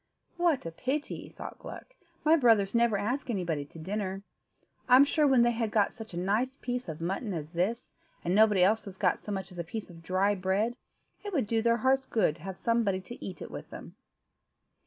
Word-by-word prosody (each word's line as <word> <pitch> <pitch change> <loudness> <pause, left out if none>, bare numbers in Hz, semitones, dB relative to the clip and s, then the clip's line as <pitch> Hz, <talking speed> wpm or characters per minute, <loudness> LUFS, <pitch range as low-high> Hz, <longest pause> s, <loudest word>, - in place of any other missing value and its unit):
"What 340 - +2
a 165 - -4
pity," 270 - -3
thought - - -9
Gluck, - - -10 0.3
"my 315 +2 +7
brothers 225 -9 +4
never 235 -3 +3
ask 245 +7 -2
anybody 170 -9 -1
to 145 - -15
dinner. 195 +3 -3 0.7
I'm 255 +3 +8
sure, 295 +1 +2
when 260 -3 +5
they've 235 -2 +1
got 210 -2 +2
such 220 -5 -9
a - - -4
nice 220 +9 0
piece 245 -6 -4
of 160 +1 -6
mutton 195 +4 -2
as 155 -1 -5
this, 195 +8 -2 0.3
and 175 - +1
nobody 210 -2 +5
else 215 +3 +3
has 195 -2 -9
got 180 -3 +2
so 210 - -7
much 190 -1 -4
as 180 - -9
a - - -1
piece 195 +3 -6
of 165 -1 -13
dry 185 +4 +2
bread, 200 +5 0 0.5
it 410 -1 -5
would 275 -9 +1
do 225 +1 +1
their 235 +1 +3
hearts 265 +3 +2
good 180 -8 +1
to - - -18
have 190 +1 -6
somebody 230 -5 +1
to 240 +6 -10
eat 190 - -6
it - - -9
with - - -8
them." - - -10
210 Hz, 210 wpm, -29 LUFS, 185-240 Hz, 0.7 s, I'm